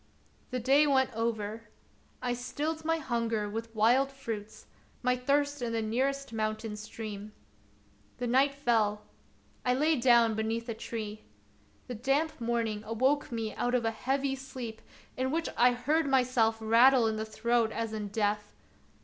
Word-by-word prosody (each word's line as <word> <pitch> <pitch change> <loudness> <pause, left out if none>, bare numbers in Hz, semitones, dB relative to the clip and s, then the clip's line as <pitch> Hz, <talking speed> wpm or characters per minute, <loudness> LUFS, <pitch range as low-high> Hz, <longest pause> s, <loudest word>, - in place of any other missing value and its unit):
The 255 - -2
day 275 +5 +4
went 265 -2 +2
over. 225 -1 -3 0.5
I 245 -1 0
stilled 300 +6 -3
my 325 +1 +1
hunger 230 -7 -1
with 225 +2 -6
wild 245 +6 +4
fruits, 225 -6 -7 0.4
my 250 0 +3
thirst 285 +2 0
in 235 -1 -2
the 225 - 0
nearest 265 +3 -1
mountain 215 0 -2
stream. 210 -1 -7 0.8
The 245 - -3
night 270 +3 +3
fell; 220 -6 +1 0.6
I 250 0 +2
lay 310 +4 +3
down 235 -2 +5
beneath 225 +2 -2
a 230 - -2
tree. 220 -1 -6 0.6
The 250 - -6
damp 275 +6 0
morning 230 -2 -1
awoke 260 +7 +1
me 225 -2 -3
out 245 +1 0
of 240 -2 +1
a 225 - +2
heavy 270 +4 -1
sleep 255 -4 -7 0.3
in 260 +1 -1
which 325 +4 -1
I 245 +1 +5
heard 295 +6 +1
myself 250 -4 +3
rattle 235 +3 +5
in 220 -1 0
the 215 - -2
throat 225 +1 0
as 225 -1 -3
in 210 -1 -3
death. 210 0 -1
235 Hz, 155 wpm, -30 LUFS, 220-265 Hz, 0.8 s, down